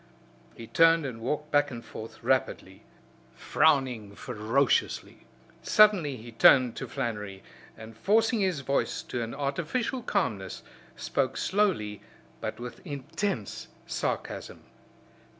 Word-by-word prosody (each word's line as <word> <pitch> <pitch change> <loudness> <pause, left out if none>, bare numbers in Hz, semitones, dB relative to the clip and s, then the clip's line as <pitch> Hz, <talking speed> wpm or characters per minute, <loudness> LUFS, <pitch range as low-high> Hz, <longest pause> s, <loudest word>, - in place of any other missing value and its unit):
He 115 - -9
turned 165 +4 +4
and 120 -4 -6
walked 150 +5 -3
back 145 0 +3
and 120 -2 -8
forth 110 0 -10
rapidly; - - -1 0.5
frowning 125 -9 +1
ferociously. 115 +7 0 0.3
Suddenly 195 -11 +4
he 115 +1 -10
turned 125 +1 +6
to - - -4
Flannery, 105 -4 -4 0.3
and 110 0 -11
forcing 220 - +2
his 185 -7 0
voice 140 +1 -1
to 120 - -4
an 115 +2 -4
artificial 170 - -2
calmness 110 - -2 0.3
spoke - - -1
slowly 175 - 0 0.4
but 110 +1 -5
with 120 0 -8
intense 145 - -4 0.2
sarcasm. - - -4
135 Hz, 115 wpm, -28 LUFS, 115-165 Hz, 0.5 s, turned